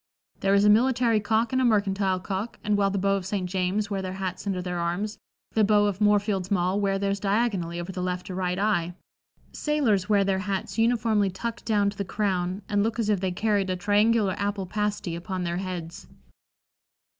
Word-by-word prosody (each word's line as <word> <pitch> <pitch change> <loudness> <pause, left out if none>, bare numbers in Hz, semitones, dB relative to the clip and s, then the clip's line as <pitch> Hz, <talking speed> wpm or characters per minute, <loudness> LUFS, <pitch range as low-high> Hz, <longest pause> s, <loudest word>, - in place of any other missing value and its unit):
There 195 0 +2
is 200 +1 +4
a - - +6
military 235 0 +3
cock 220 +3 0
and 260 - +2
a - - +2
mercantile 200 -4 +2
cock, 195 +4 -4
and 210 0 +1
while 200 -1 +2
the 200 - -2
beaux 195 +1 +2
of 190 - -6
St. 195 -2 -2
James 190 +3 -1
wear 195 -1 -1
their 185 -1 -4
hats 190 0 -5
under 190 -2 -1
their 180 -1 -3
arms, 180 +5 -2 0.3
the 220 - +2
beaux 205 0 +4
of 205 0 -2
Moorfields 205 -2 +2
Mall 185 +1 +1
wear 195 -1 +1
theirs 200 0 -1
diagonally 195 -5 0
over 175 +2 -5
the 185 -1 -5
left 180 0 -3
or - - -4
right 180 0 -1
eye; 180 -4 0 0.6
sailors 230 -11 0
wear 205 -2 +4
their 195 -1 0
hats 195 +2 -3
uniformly 225 -3 +2
tucked 230 +5 -5
down 205 -2 +2
to 200 - -15
the - - 0
crown, 190 -1 -2
and 205 -1 +1
look 220 +2 -1
as 225 -3 0
if 205 -3 +2
they 185 0 -1
carried 205 0 0
a 185 - 0
triangular 205 +1 +2
apple 200 -1 -1
pasty 205 -2 -2
upon 180 +2 -4
their 170 0 -2
heads." 180 -3 -6
200 Hz, 205 wpm, -26 LUFS, 185-210 Hz, 0.6 s, a